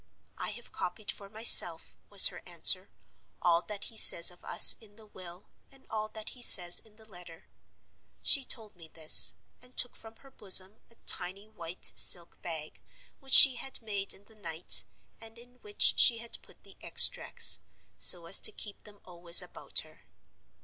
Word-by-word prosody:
'I -, -, -8 dB
have 240 Hz, +2 st, -16 dB
copied 205 Hz, +4 st, -11 dB
for 200 Hz, -1 st, -15 dB
myself,' 220 Hz, +3 st, +1 dB
was -, -, +1 dB
her -, -, -18 dB
answer, -, -, -1 dB, 0.5 s
'all 170 Hz, -1 st, -5 dB
that 205 Hz, +1 st, -12 dB
he 225 Hz, -, -14 dB
says 170 Hz, -4 st, +7 dB
of 175 Hz, -, -22 dB
us -, -, +6 dB
in 210 Hz, -2 st, -22 dB
the 220 Hz, 0 st, -22 dB
will, 185 Hz, -2 st, -17 dB, 0.2 s
and 270 Hz, -1 st, -24 dB
all 215 Hz, -1 st, -10 dB
that 215 Hz, 0 st, -13 dB
he 250 Hz, -, -16 dB
says 175 Hz, -6 st, +1 dB
in 220 Hz, -2 st, -25 dB
the 220 Hz, 0 st, -25 dB
letter.' 175 Hz, -5 st, -19 dB, 0.8 s
She 280 Hz, -, +1 dB
told 220 Hz, -5 st, -7 dB
me 165 Hz, -2 st, -21 dB
this, 160 Hz, -1 st, 0 dB, 0.3 s
and 250 Hz, +1 st, -24 dB
took 245 Hz, -, -2 dB
from 225 Hz, 0 st, -15 dB
her 270 Hz, +2 st, -26 dB
bosom 195 Hz, -2 st, +7 dB
a 230 Hz, -, -29 dB
tiny 190 Hz, +3 st, -2 dB
white 175 Hz, -4 st, -7 dB
silk 170 Hz, -2 st, -2 dB
bag, 160 Hz, -3 st, -12 dB, 0.4 s
which 270 Hz, -2 st, -10 dB
she 265 Hz, -3 st, +5 dB
had 270 Hz, -, -7 dB
made 205 Hz, -3 st, -11 dB
in 200 Hz, -, -14 dB
the 220 Hz, -, -26 dB
night, 170 Hz, -5 st, -2 dB, 0.3 s
and 225 Hz, 0 st, -18 dB
in 245 Hz, +1 st, -23 dB
which 415 Hz, -1 st, -3 dB
she 235 Hz, -, +1 dB
had 235 Hz, 0 st, -10 dB
put -, -, -28 dB
the -, -, -23 dB
extracts, -, -, -2 dB, 0.4 s
so 175 Hz, -2 st, +1 dB
as 170 Hz, -, +1 dB
to -, -, +1 dB
keep 205 Hz, -2 st, -14 dB
them 205 Hz, -1 st, -21 dB
always 175 Hz, -1 st, 0 dB
about -, -, -9 dB
her. -, -, -27 dB
205 Hz, 180 wpm, -24 LUFS, 175-225 Hz, 0.8 s, says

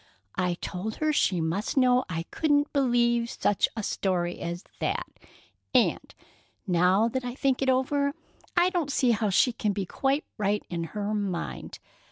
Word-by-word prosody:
I 180 Hz, -1 st, 0 dB
told 200 Hz, +4 st, -4 dB
her 310 Hz, 0 st, 0 dB
she 185 Hz, -10 st, +2 dB
must 170 Hz, -, -2 dB
know 255 Hz, -1 st, +4 dB
I 165 Hz, -1 st, -2 dB
couldn't 290 Hz, -1 st, +1 dB
believe 240 Hz, -3 st, +2 dB
such 205 Hz, -, +1 dB
a 220 Hz, -, -2 dB
story 180 Hz, -3 st, -1 dB
as 175 Hz, +2 st, -4 dB, 0.2 s
that, -, -, -1 dB, 0.7 s
and, -, -, +2 dB, 0.5 s
now 185 Hz, +3 st, +3 dB
that 260 Hz, +2 st, -3 dB
I 245 Hz, 0 st, -4 dB
think 270 Hz, -2 st, +1 dB
it 265 Hz, -, +2 dB
over, 280 Hz, +2 st, +1 dB, 0.4 s
I 355 Hz, +1 st, +4 dB
don't 335 Hz, -6 st, -1 dB
see 255 Hz, -3 st, +3 dB
how 220 Hz, -2 st, +1 dB
she 235 Hz, +6 st, +3 dB
can 210 Hz, -3 st, -1 dB
be 195 Hz, -1 st, -2 dB
quite 275 Hz, -, 0 dB
right 205 Hz, 0 st, 0 dB
in 170 Hz, -1 st, -2 dB
her 210 Hz, 0 st, -2 dB
mind. 200 Hz, -5 st, -3 dB
225 Hz, 165 wpm, -27 LUFS, 185-265 Hz, 0.7 s, know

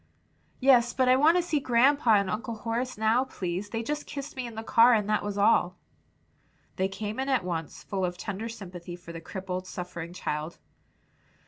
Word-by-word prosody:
"Yes, 250 Hz, -3 st, +5 dB
but 255 Hz, -1 st, +2 dB
I 255 Hz, -, +6 dB
want 310 Hz, +6 st, +5 dB
to 355 Hz, -, +2 dB
see 320 Hz, -3 st, 0 dB
grandpa 250 Hz, -1 st, +4 dB
and 200 Hz, -1 st, +2 dB
Uncle 225 Hz, +4 st, -3 dB
Horace 235 Hz, +3 st, -3 dB
now, 220 Hz, +4 st, +3 dB
please; 185 Hz, -4 st, -4 dB
they 225 Hz, +1 st, -3 dB
just 295 Hz, +4 st, -3 dB
kissed 285 Hz, 0 st, -6 dB
me 255 Hz, -2 st, -4 dB
in 230 Hz, -, -9 dB
the 225 Hz, -, -5 dB
car, 235 Hz, +1 st, +6 dB
and 210 Hz, -2 st, 0 dB
that 215 Hz, 0 st, +1 dB
was 205 Hz, -1 st, -4 dB
all." 190 Hz, -3 st, +3 dB, 1.0 s
They 190 Hz, -, +1 dB
came 210 Hz, +3 st, -5 dB
in 265 Hz, +1 st, -1 dB
at 260 Hz, -7 st, +2 dB
once, 165 Hz, -3 st, -4 dB
full 195 Hz, -2 st, -3 dB
of 180 Hz, 0 st, -2 dB
tender 205 Hz, +4 st, -5 dB
sympathy 180 Hz, -5 st, -8 dB
for 175 Hz, -1 st, -11 dB
the 165 Hz, -, -7 dB
crippled, 185 Hz, +1 st, -5 dB
suffering 175 Hz, -2 st, -6 dB
child. 155 Hz, -2 st, -4 dB
215 Hz, 195 wpm, -28 LUFS, 185-250 Hz, 1.0 s, I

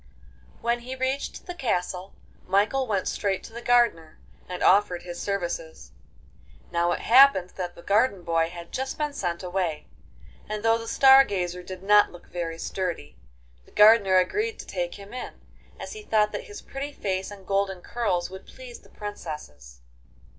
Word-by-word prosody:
IV -, -, -27 dB
When 235 Hz, +1 st, +1 dB
he 255 Hz, +2 st, -7 dB
reached 260 Hz, +2 st, -3 dB
the 355 Hz, -, -6 dB
castle, 185 Hz, -, -2 dB, 0.3 s
Michael 210 Hz, +8 st, +2 dB
went 200 Hz, -4 st, -1 dB
straight 195 Hz, -2 st, -1 dB
to 225 Hz, -, -11 dB
the 235 Hz, -, -7 dB
gardener 235 Hz, -11 st, +2 dB, 0.3 s
and 180 Hz, -1 st, -4 dB
offered 185 Hz, -3 st, +4 dB
his 175 Hz, -1 st, -7 dB
services. 170 Hz, -, -4 dB, 0.8 s
Now 170 Hz, 0 st, +1 dB
it -, -, -4 dB
happened 235 Hz, -7 st, +6 dB
that 175 Hz, -2 st, -5 dB
the 170 Hz, -, -13 dB
garden 205 Hz, -2 st, +2 dB
boy 165 Hz, -1 st, +1 dB
had 170 Hz, -1 st, -10 dB
just 265 Hz, +1 st, -3 dB
been 300 Hz, -1 st, -2 dB
sent 175 Hz, -8 st, -3 dB
away, 180 Hz, -4 st, -2 dB, 0.6 s
and 215 Hz, 0 st, -4 dB
though 225 Hz, 0 st, +4 dB
the 230 Hz, -, -8 dB
Star 270 Hz, +2 st, +7 dB
Gazer 180 Hz, -6 st, -3 dB
did 185 Hz, +1 st, -9 dB
not 205 Hz, +1 st, +5 dB
look 175 Hz, -, -14 dB
very 165 Hz, -2 st, -4 dB
sturdy, 170 Hz, -, -4 dB, 0.5 s
the -, -, -21 dB
gardener 210 Hz, -3 st, +6 dB
agreed 425 Hz, -, 0 dB
to -, -, -9 dB
take 175 Hz, -2 st, -3 dB
him, 200 Hz, +2 st, -12 dB, 0.7 s
as -, -, -7 dB
he 430 Hz, -, -8 dB
thought 215 Hz, -, +2 dB
that -, -, -5 dB
his 415 Hz, -1 st, -10 dB
pretty 280 Hz, +2 st, -6 dB
face 190 Hz, -6 st, -3 dB
and 200 Hz, -2 st, -12 dB
golden 195 Hz, -2 st, 0 dB
curls 185 Hz, -7 st, -1 dB
would 190 Hz, 0 st, -10 dB
please 255 Hz, -2 st, -11 dB
the -, -, -21 dB
princesses. 150 Hz, -, -8 dB
195 Hz, 170 wpm, -26 LUFS, 175-235 Hz, 0.8 s, Star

